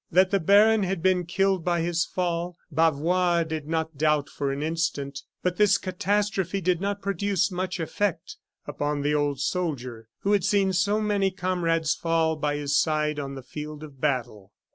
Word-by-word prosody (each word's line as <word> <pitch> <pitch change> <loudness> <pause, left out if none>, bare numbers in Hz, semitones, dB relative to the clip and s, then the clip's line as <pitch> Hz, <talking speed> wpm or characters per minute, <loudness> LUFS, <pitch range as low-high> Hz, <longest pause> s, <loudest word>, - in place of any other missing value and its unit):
That 185 +2 +4
the 200 - +3
baron 210 +5 +5
had 190 -3 -2
been 185 -2 +2
killed 190 0 +1
by 175 -1 +1
his 170 0 0
fall, 175 -1 -2
Bavois 165 +3 +2
did 160 -2 -5
not 160 -2 -2
doubt 150 -2 +2
for 140 -1 -2
an 140 +2 -3
instant. 150 -3 -2 0.2
But 180 -1 0
this 210 -1 +5
catastrophe 195 0 -1
did 180 -1 0
not 200 0 -2
produce 200 -2 0
much 185 +1 -3
effect 180 +3 -2 0.3
upon 145 -1 -2
the 145 +1 +1
old 145 -2 0
soldier, 130 -10 -3
who 200 - 0
had 205 -3 +3
seen 195 0 +2
so 200 +4 +2
many 205 -2 +1
comrades 175 -4 0
fall 165 -1 +1
by 150 -1 -1
his 145 -1 -1
side 150 0 +1
on 140 -1 -5
the 135 - -8
field 150 +3 -7
of 140 -4 -12
battle. 120 -9 -2
165 Hz, 175 wpm, -26 LUFS, 150-190 Hz, 0.3 s, baron